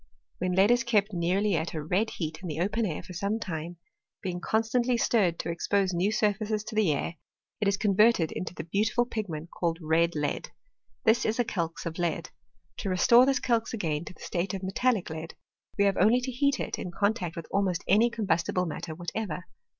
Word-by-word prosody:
When 180 0 0
lead 195 +5 +5
is 240 -1 +3
kept 215 -3 +1
nearly 185 +3 +1
at 160 +1 -2
a 155 - -3
red 190 +8 +1
heat 155 -2 -4
in 185 - -6
the 155 -1 -4
open 210 +5 0
air 155 - -4
for 180 - -10
some 200 +4 -1
time, 170 -3 -5 0.5
being 180 -1 -3
constantly 235 +4 +1
stirred 195 -8 +2
to - - -3
expose 190 +2 0
new 180 +4 +1
surfaces 215 0 0
to 215 - -7
the 210 -7 +3
air, 160 +3 -2 0.4
it 210 - +1
is 200 0 +2
converted 210 -4 +3
into 180 0 -5
the 155 - -5
beau 185 +5 0
tiful 240 +2 +1
pigment 175 -9 -5
called 165 -2 -1
red 165 +1 +2
lead; 150 -1 -2 0.5
this 225 +2 +4
is 220 - 0
a 245 - +3
calx 170 -7 -3
of 165 0 -4
lead. 170 -1 -1 0.5
To 195 - -3
restore 235 +7 +6
this 270 -1 +2
calx 230 -1 0
again 160 -7 -2
to - - -8
the - - -19
state 180 +2 -2
of 190 - -6
metallic 195 -1 0
lead, 160 +1 -6 0.4
we 200 - +4
have 200 -1 +2
only 220 +7 +5
to 260 +1 -3
heat 280 +3 +1
it - - -3
in - - -4
contact 180 -2 -1
with 165 - -6
almost 190 -3 0
any 215 +5 +5
com 230 -2 -4
bustible 180 0 +1
matter 160 0 -5
whatever. 175 0 -4
190 Hz, 210 wpm, -28 LUFS, 170-220 Hz, 0.5 s, restore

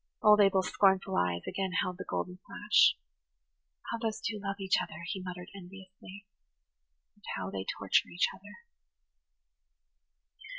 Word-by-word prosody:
Old 210 -1 +7
Abel's 195 -2 +3
scornful 190 -1 +3
eyes 85 -1 0
again 190 -1 -2
held 180 0 -4
the - - -5
golden 180 0 -3
flash. 210 0 +4 0.9
"How 230 - -2
those 225 -2 -2
two 210 -1 -3
love 195 0 -2
each 190 -1 +2
other!" 160 - -7
he 190 +2 -4
muttered 180 -1 -7
enviously. 195 +1 -12 0.9
"And 205 - -30
how 95 +1 -4
they 95 -1 -4
torture 100 -1 +2
each 175 - +2
other!" 205 - -15
190 Hz, 135 wpm, -31 LUFS, 180-205 Hz, 0.9 s, Old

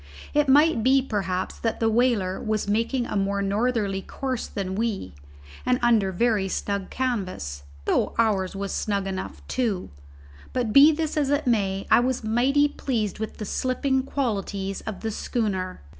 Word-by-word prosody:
It 295 -1 +3
might 295 -2 +5
be 265 +3 +5
perhaps 190 -6 -2
that 225 - -1
the 225 - +2
whaler 225 -5 +1
was 215 -1 -1
making 230 +4 0
a - - -4
more 200 0 0
northerly 205 -1 0
course 260 +4 -4
than 190 -2 -4
we, 205 - -2 0.5
and 250 0 +2
under 220 -5 +3
very 210 0 +1
snug 200 0 -2
canvas, 190 - -3 0.2
though - - +1
ours 200 -5 +1
was 195 0 -3
snug 200 -2 -1
enough, 190 -1 -5
too; 220 -8 -1 0.6
but 240 -4 -1
be 285 +3 +9
this 315 0 -2
as 285 -3 +1
it 290 +1 +1
may, 200 -5 +1
I - - +8
was 250 0 0
mighty 260 +6 +3
pleased 230 -9 -2
with 220 - -5
the 210 - -5
slipping 265 +4 0
qualities 200 -7 -2
of 215 -3 -5
the 225 - -2
schooner. 200 - -2
220 Hz, 160 wpm, -25 LUFS, 195-255 Hz, 0.6 s, be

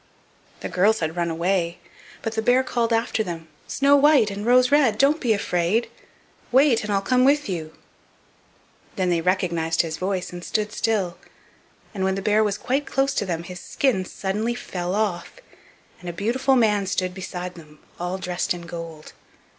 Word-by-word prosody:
The - - -3
girls 210 +5 +2
had 160 0 -2
run 170 -1 -1
away, 170 +1 0 0.5
but 225 - -2
the 220 - -1
bear 250 +3 +3
called 240 -2 -1
after 225 -1 +1
them: 165 -4 -7 0.2
"Snow 280 +1 +3
white 285 -7 +5
and 205 +3 -5
Rose 250 +2 +5
red, 270 -8 +4
don't 285 +6 +3
be 240 - +1
afraid; 200 +1 0 0.6
wait, 260 -2 +4
and 210 - -3
I'll 195 -1 +1
come 255 +3 +3
with 290 +2 +3
you." 160 -5 -5 1.2
Then 185 -2 0
they 170 -1 +1
recognized 170 -3 +1
his 160 -1 -4
voice 185 -1 -3
and 175 0 -7
stood 210 +2 -1
still, 205 -6 -1 0.7
and 195 -3 -3
when 190 0 +1
the 195 - -3
bear 215 +1 +3
was 205 -2 0
quite 270 +6 -1
close 270 0 +1
to 205 - -1
them 170 -2 -2
his 180 +1 -8
skin 245 -5 0
suddenly 210 +5 -2
fell 180 -6 -4
off, 205 -5 -1 0.7
and 180 - -7
a - - -5
beautiful 245 +9 +1
man 210 -5 +2
stood 185 -1 -1
beside 180 -1 -6
them, 155 -3 -15 0.2
all 180 +2 -2
dressed 180 -1 -2
in 175 - -9
gold. 165 -2 -8
195 Hz, 180 wpm, -23 LUFS, 175-235 Hz, 1.2 s, white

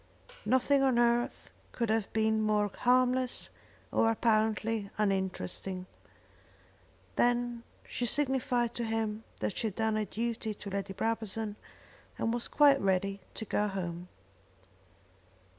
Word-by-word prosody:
Nothing 260 +4 +3
on 265 -3 +3
earth 240 0 +1 0.2
could 235 -3 0
have 220 -2 0
been 220 0 +2
more 210 -1 +2
harmless 255 0 +2 0.4
or 225 - +3
apparently 220 -1 +1
uninteresting. 190 - -1 1.3
Then 240 -1 +2 0.3
she 245 - -2
signified 250 -3 +1
to 240 - -2
him 220 -1 -2 0.2
that - - -1
she 225 - 0
had 200 - -5
done 220 -1 +1
her 215 - 0
duty 225 -1 -3
to 200 - -8
Lady 195 0 -3
Brabazon 220 0 -2 0.6
and 225 - 0
was 240 0 -1
quite 285 -2 +5
ready 195 +1 0
to 220 - -4
go 210 0 +1
home. 180 -3 -4
220 Hz, 125 wpm, -31 LUFS, 205-240 Hz, 1.3 s, quite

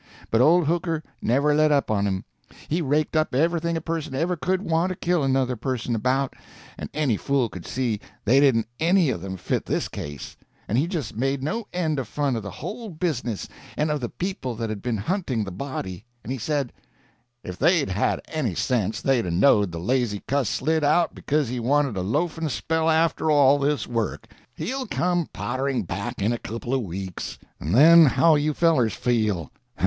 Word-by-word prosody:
But 115 - +4
old 170 +5 +5
Hooker 165 0 0 0.2
never 140 +5 +2
let 155 0 +4
up 140 -5 +2
on 100 -1 +1
him. 95 -1 -2 0.4
He 165 +4 0
raked 150 +1 0
up 155 -4 +1
everything 170 +3 +1
a - - -4
person 160 -3 -3
ever 170 +6 0
could 185 +3 -1
want 165 0 +1
to 185 - -3
kill 175 -1 0
another 130 -1 +1
person 120 0 -2
about, 130 +4 0 0.4
and - - -7
any 140 -8 0
fool 135 -2 0
could 90 -4 -9
see 120 -5 -1 0.3
they 125 +6 +5
didn't 130 -6 +3
any 170 -2 +3
of 90 - -4
them 95 0 -5
fit - - -2
this - - 0
case, 75 -1 -7 0.3
and 115 - +1
he 155 - +1
just 165 - -4
made 135 +3 -1
no 215 +9 -2
end 160 -5 -1
of 130 - -4
fun 140 +1 -1
of 115 - -2
the 100 - -6
whole 220 - -6
business 155 - -3 0.3
and 150 +1 +1
of 150 -2 -1
the 120 - -3
people 180 - -4
that 115 0 -3
had 105 -2 -5
been 120 -3 -1
hunting 130 - -1
the 95 - -6
body; 95 -3 -5 0.2
and 120 - -6
he 130 - -3
said: 140 +1 -1 0.7
"If 90 0 -7
they'd 160 - +3
had 95 +3 0
any 130 - -2
sense 110 -2 -1
they'd 130 -7 +2
'a' - - -1
knowed 100 +1 +4
the 85 - -6
lazy 115 +1 0
cuss 140 -4 +1
slid 160 +3 0
out 155 +3 +3
because 150 -1 0
he 125 +1 -3
wanted 135 0 +1
a 95 - -1
loafing 155 - -1
spell 160 +5 0
after 160 0 +2
all 145 -1 +5
this 145 +1 0
work. 115 -4 -2 0.3
He'll 260 0 -3
come 175 -4 0
pottering 130 -3 -2
back 100 +5 -4
in 110 +4 +2
a 120 - -3
couple 115 +3 -5
of 135 - +2
weeks, 95 -2 -6 0.2
and 80 +7 -1
then 165 +4 +8
how'll 150 +4 +4
you 150 0 0
fellers 130 - +3
feel? 110 - 0
135 Hz, 195 wpm, -24 LUFS, 115-160 Hz, 0.7 s, then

